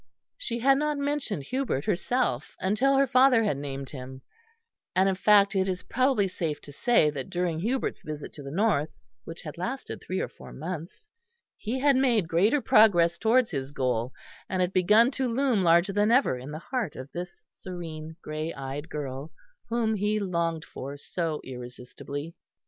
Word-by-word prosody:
She 235 - -3
had 270 +3 +4
not 300 0 0
mentioned 280 - -2
Hubert 250 - -2
herself, 205 - 0
until 255 +8 +2
her 275 - +5
father 255 -2 +5
had 200 -10 0
named 140 -1 -5
him; 130 -1 -9 0.7
and 190 +1 +4
in 195 - +3
fact 200 +1 +4
it 190 0 +2
is 180 -1 -3
probably 255 -5 +2
safe 160 -5 -3
to 145 - -11
say 155 - +3
that 135 -3 -6
during 175 -2 -1
Hubert's 245 +9 -1
visit 150 -1 -7
to 150 - -9
the 140 - -7
north, 165 -3 +1 0.4
which 165 - -8
had 155 0 -8
lasted 255 +9 -4
three 185 - -3
or - - -1
four - - -13
months, 170 - -7 0.5
he 230 +5 -3
had 280 -1 +5
made 240 -8 +3
greater 205 - +3
progress 175 -8 +5
towards 235 +1 +3
his 135 -3 -3
goal, 125 -3 -1 0.4
and 185 - -1
had 180 +1 0
begun 210 +7 +5
to 265 -1 -1
loom 250 -4 +2
larger 170 +3 +4
than 205 +2 +3
ever 250 - +4
in 125 +3 -8
the 150 - -5
heart 245 - -1
of 130 +2 -8
this 175 +1 -7
serene 160 -3 -7
grey 155 +1 -3
eyed 135 +3 -6
girl, 140 0 -5 0.4
whom 230 -1 +1
he 210 +1 0
longed 170 -4 -1
for 140 +1 -7
so 160 +1 -3
irresistibly. 130 +5 -7
180 Hz, 175 wpm, -27 LUFS, 150-230 Hz, 0.7 s, her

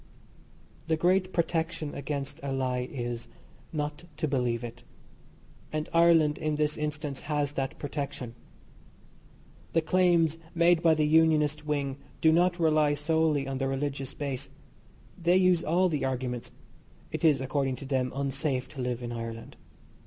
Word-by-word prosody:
The 160 0 +2
great 185 +3 +2
protection 165 -3 -1
against 140 0 -4
a 140 0 -3
lie 130 -1 -1
is 120 -3 -4 0.4
not 150 +2 -3
to 155 - 0
believe 125 -4 0
it; 120 - -8 0.9
and 155 0 -2
Ireland, 165 -3 +5
in 155 -1 -1
this 150 0 +1
instance, 150 -2 -3
has 145 -1 0
that 135 -2 -3
protection. 140 -4 -4 1.4
The 165 - +4
claims 170 -2 +3 0.2
made 170 0 +4
by 165 -2 +5
the 155 -1 +2
Unionist 155 -1 +3
Wing 140 -2 -1 0.2
do 160 - +5
not 175 +2 +3
rely 155 -2 +3
solely 150 -1 +1
on 135 -1 -3
the 135 - 0
religious 135 0 -3
base. 140 -3 -4 0.7
They 175 +2 +4
use 180 -3 +4
all 180 +4 +3
the 155 -5 -1
arguments. 125 -2 -2 0.6
It - - -4
is, 150 -5 +5
according 135 0 -1
to 135 - -9
them, 130 -2 0
unsafe 135 -1 -1
to 135 - -7
live 125 -1 -2
in 120 - -4
Ireland. 115 -1 -6
150 Hz, 145 wpm, -29 LUFS, 135-160 Hz, 1.4 s, Ireland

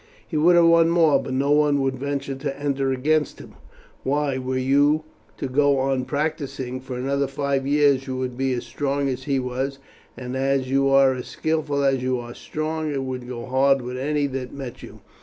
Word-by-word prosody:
He 165 - -6
would 170 +4 +5
have 170 -1 +6
won 165 0 +5
more, 165 -3 +4
but - - -6
no 140 +2 +1
one 145 -1 +3
would 135 -1 0
venture 140 +1 -3
to 135 +1 -5
enter 140 -2 0
against 150 +3 0
him. - - -12 0.5
Why, 140 -1 0
were 130 0 -2
you 145 +4 +3 0.3
to - - -3
go 140 +1 +3
on 130 -1 0
practising 140 -4 -3
for 130 -1 -7
another 140 +2 0
five 135 0 -1
years, 140 -2 +3
you 130 -1 -3
would 130 -1 -3
be 135 +1 0
as 120 - -3
strong 140 0 -2
as 130 0 -4
he 140 -2 +1
was, 130 +2 -2 0.4
and 125 0 -6
as 135 -1 0
you 135 0 +3
are 135 -1 +5
as 125 -1 -6
skilful 155 -3 -1
as 135 -2 +2
you 130 0 0
are 120 0 -8
strong 155 +2 -3
it 135 -2 -2
would 130 -1 -5
go 120 -2 -6
hard 135 +1 +2
with 125 +1 -5
any 145 +2 0
that 130 -2 -4
met 135 -4 -8
you. - - -12
135 Hz, 205 wpm, -23 LUFS, 130-145 Hz, 0.5 s, have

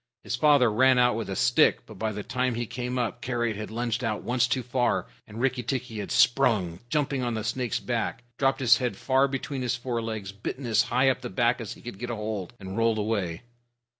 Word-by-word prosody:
His - - -2
father 135 -3 +5
ran 130 +4 +4
out 125 -2 +4
with 115 -2 -4
a 95 - -3
stick, - - +3
but - - -12
by 110 0 -1
the 105 0 -5
time 125 +1 -1
he 120 +1 -2
came 125 +2 -4
up, 120 0 -2
Karait 120 -3 -1
had 105 +1 -6
lunged 120 +1 -2
out 110 -2 -2
once 125 0 +2
too 130 +1 -1
far, 125 0 0 0.2
and 105 +2 -9
Rikki 130 0 +1
tikki 125 -2 -3
had 100 - -5
sprung, 110 -10 +3
jumped 145 0 0
on 125 -3 -1
the 110 - -3
snake's 125 +1 -1
back, 120 0 -2 0.2
dropped 135 0 +2
his 120 -2 +6
head 125 -2 -2
far 130 +3 +3
between 135 0 -4
his 125 -1 0
forelegs, 115 -5 -4
bitten 110 +6 -6
as 115 -2 +3
high 130 +2 +4
up 125 - -5
the - - -5
back 120 +5 +1
as 110 - -5
he - - -16
could 120 -5 -8
get 120 +1 -4
hold, 105 -3 -4
and 95 +1 -7
rolled 115 -1 +2
away. 100 -4 -2
120 Hz, 225 wpm, -27 LUFS, 110-125 Hz, 0.2 s, his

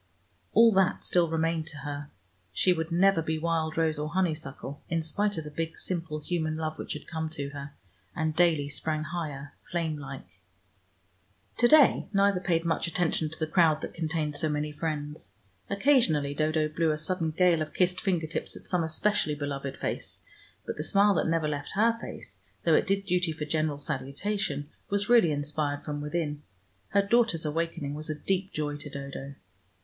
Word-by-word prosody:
All 230 +1 +7
that 190 -2 +2
still 175 -2 +3
remained 165 0 0
to 155 - -8
her: 145 0 -5 0.4
she 180 - +3
would 160 0 -3
never 185 0 +4
be 160 0 -1
wild 160 -1 -1
rose 160 -2 +1
or 150 +1 -2
honeysuckle, 155 -5 -2
in 165 -1 0
spite 205 +5 0
of 160 - -2
the 150 - -8
big 165 +1 -3
simple 165 -4 -3
human 155 -1 -1
love 155 -1 -3
which - - -3
had 150 - -8
come 160 -1 -3
to 145 -3 -4
her, 140 0 -8 0.4
and 160 -1 -1
daily 160 -4 +3
sprang 155 +2 -2
higher, 150 -4 -5 0.2
flame 160 -3 -1
like. 135 -1 -7 1.3
To 240 - +5
day 300 0 +6
neither 200 -1 +4
paid 170 -2 0
much 165 +1 +1
attention 165 -2 0
to 160 - -9
the 155 - 0
crowd 155 -1 +3
that - - -5
contained 160 -2 -2
so 155 +2 0
many 150 0 -1
friends. 150 - -4 0.4
Occasionally 200 - +3
Dodo 155 +1 +1
blew 160 +1 0
a 155 - +1
sudden 165 +1 0
gale 170 0 +3
of 155 - -4
kissed 180 0 +2
finger 180 -5 +1
tips 160 - -4
at - - -12
some 180 -2 0
especially 160 0 +1
beloved 140 -2 -4
face, - - -4 0.4
but - - -4
the 150 - -2
smile 200 +4 +4
that - - +1
never 165 -1 +1
left 145 -1 -3
her 225 +3 +4
face, - - -8 0.3
though - - +5
it - - +4
did 195 0 +1
duty 180 -2 +1
for 150 -1 -4
general 155 -1 0
salutation, 145 +5 -2 0.2
was 205 +2 0
really 230 -9 +6
inspired 145 0 -2
from 145 -1 -3
within. 150 -1 -2 0.5
Her 200 0 +3
daughter's 215 -6 +2
awakening 160 -1 -2
was 155 +1 -6
a 155 - -1
deep 190 +4 -1
joy 145 -1 -2
to 145 0 -9
Dodo. 140 0 -7
160 Hz, 185 wpm, -28 LUFS, 150-175 Hz, 1.3 s, All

